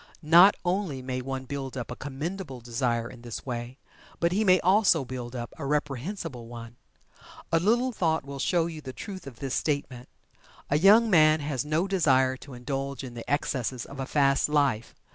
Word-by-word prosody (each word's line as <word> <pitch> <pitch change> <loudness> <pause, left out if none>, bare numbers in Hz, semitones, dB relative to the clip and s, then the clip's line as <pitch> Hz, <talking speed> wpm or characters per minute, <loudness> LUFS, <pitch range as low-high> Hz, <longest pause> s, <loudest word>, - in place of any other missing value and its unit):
Not 170 +6 +7
only 175 -8 -1
may 130 0 -3
one 135 0 -5
build 135 -1 -5
up 125 -1 -5
a - - -4
commendable 145 +1 -5
desire 120 0 -1
in 120 0 -12
this 120 -1 -7
way, 120 0 -5 0.4
but 170 0 +2
he 205 +4 +1
may 185 -3 +5
also 185 -5 +4
build 125 -1 -6
up 120 -1 -6
a 140 - -4
reprehensible 145 - -3
one. 115 0 -10 0.7
A 165 - +4
little 240 +8 +2
thought 160 - 0
will 140 0 -7
show 170 +3 +2
you 165 -2 -6
the 130 -3 -8
truth 190 -4 -8
of 125 -4 -10
this 135 0 -4
statement. 140 -4 -2 0.6
A 145 - +3
young 210 +6 +7
man 155 -2 +6
has 140 -4 -2
no 155 +5 0
desire 130 -9 +3
to 135 -1 -11
indulge 135 +1 -4
in 125 -2 -7
the 120 +2 -7
excesses 130 -4 -1
of 140 - -10
a 135 - -3
"fast" 140 -1 +2
life. 140 -7 +1
140 Hz, 185 wpm, -27 LUFS, 125-165 Hz, 0.7 s, Not